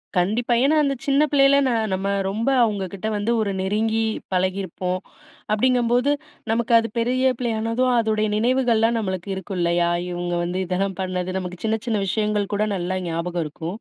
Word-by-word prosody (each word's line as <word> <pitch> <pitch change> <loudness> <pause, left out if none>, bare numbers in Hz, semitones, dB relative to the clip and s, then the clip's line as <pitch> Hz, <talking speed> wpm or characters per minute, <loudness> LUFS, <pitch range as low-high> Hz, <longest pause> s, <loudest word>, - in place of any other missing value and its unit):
கண்டிப்பா. 220 +7 +1
ஏன்னா, 290 +3 +3
அந்த 275 -1 +1
சின்ன 280 +1 +3
பிள்ளைல 275 -1 +5
ந 255 - +1 0.2
நம்ம 190 +1 -2 0.2
ரொம்ப, 225 +6 -1
அவுங்க 205 -4 0
கிட்ட 195 +3 -4
வந்து 205 +3 -1
ஒரு 205 -2 -1
நெருங்கி 220 +3 0 0.3
பழகியிருப்போம். 185 0 -1 0.5
அப்டீங்கம்போது 245 +3 +2 0.4
நமக்கு 235 +1 0
அது 230 - -2
பெரிய 255 +3 +1
பிள்ளையானதும், 230 +1 0
அதோடைய 215 -1 +1
நினைவுகள்லாம் 235 -1 +2
நம்மளுக்கு 190 -2 -4
இருக்கும் 190 0 -6
இல்லயா? 170 0 +2 0.2
இவுங்க 175 0 -3
வந்து 175 +1 -3
இதெல்லாம் 190 +1 -2
பண்ணது 185 0 -3
நமக்கு 180 -1 -6
சின்ன 220 0 0
சின்ன 220 -4 0
விஷயங்கள் 210 0 0
கூட 205 +1 +1
நல்லா 185 0 -2
ஞாபகம் 170 +1 -2
இருக்கும். 165 +6 -6
210 Hz, 155 wpm, -22 LUFS, 185-235 Hz, 0.5 s, பிள்ளைல